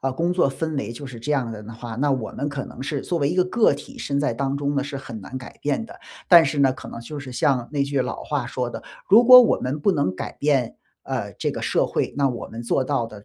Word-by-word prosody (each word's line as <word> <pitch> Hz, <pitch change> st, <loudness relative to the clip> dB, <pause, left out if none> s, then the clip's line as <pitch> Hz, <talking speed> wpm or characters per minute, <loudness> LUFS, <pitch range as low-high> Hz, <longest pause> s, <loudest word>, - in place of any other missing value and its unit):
呃， 135 Hz, -, -1 dB
工 170 Hz, +6 st, 0 dB
作 175 Hz, -6 st, +2 dB
氛 160 Hz, +3 st, -3 dB
围 115 Hz, -5 st, -3 dB
就 120 Hz, +4 st, -8 dB
是 120 Hz, -3 st, -9 dB
这 145 Hz, -, -4 dB
样 130 Hz, -6 st, 0 dB
的 105 Hz, -1 st, -8 dB
呢 110 Hz, +2 st, -9 dB
话， 115 Hz, 0 st, -7 dB
那 145 Hz, +5 st, +1 dB
我 130 Hz, -5 st, -2 dB
们 145 Hz, -, -3 dB
可 145 Hz, -2 st, -4 dB
能 130 Hz, -, -9 dB
是 140 Hz, +1 st, -2 dB
作 175 Hz, -, -2 dB
为 140 Hz, -, +2 dB
一 175 Hz, -, -2 dB
个 180 Hz, -, +4 dB
个 215 Hz, +2 st, +3 dB
体， 140 Hz, +1 st, -8 dB
身 140 Hz, -1 st, -2 dB
在 140 Hz, -5 st, 0 dB
当 135 Hz, +2 st, -1 dB
中 145 Hz, 0 st, -1 dB
呢 140 Hz, -, +1 dB
是 145 Hz, 0 st, -5 dB
很 135 Hz, -5 st, -8 dB
难 125 Hz, +7 st, -7 dB
改 125 Hz, -, -11 dB
变 150 Hz, +10 st, -1 dB
的。 -, -, -12 dB, 0.3 s
但 170 Hz, -2 st, +9 dB
是 140 Hz, +1 st, -2 dB
呢， 135 Hz, -2 st, +4 dB
可 -, -, -10 dB
能 -, -, -8 dB
就 145 Hz, +5 st, -7 dB
是 130 Hz, -2 st, -8 dB
像 125 Hz, -1 st, +1 dB
那 140 Hz, -1 st, 0 dB
句 140 Hz, -1 st, 0 dB
老 125 Hz, -, -5 dB
话 145 Hz, -5 st, -2 dB
说 125 Hz, 0 st, -3 dB
的： -, -, -7 dB, 0.3 s
“如 225 Hz, +4 st, +7 dB
果 250 Hz, +1 st, +11 dB
我 240 Hz, -, +4 dB
们 135 Hz, +4 st, -3 dB
不 195 Hz, +7 st, +2 dB
能 140 Hz, -, 0 dB
改 -, -, -5 dB
变， 140 Hz, -5 st, 0 dB, 0.3 s
呃， -, -, -3 dB
这 -, -, -2 dB
个 -, -, -6 dB
社 -, -, +1 dB
会， -, -, -1 dB
那 140 Hz, -1 st, +3 dB
我 120 Hz, -3 st, -5 dB
们 115 Hz, -, -8 dB
做 120 Hz, +3 st, 0 dB
到 130 Hz, -3 st, -1 dB
的 105 Hz, -2 st, -12 dB
140 Hz, 310 characters per minute, -23 LUFS, 125-145 Hz, 0.3 s, 果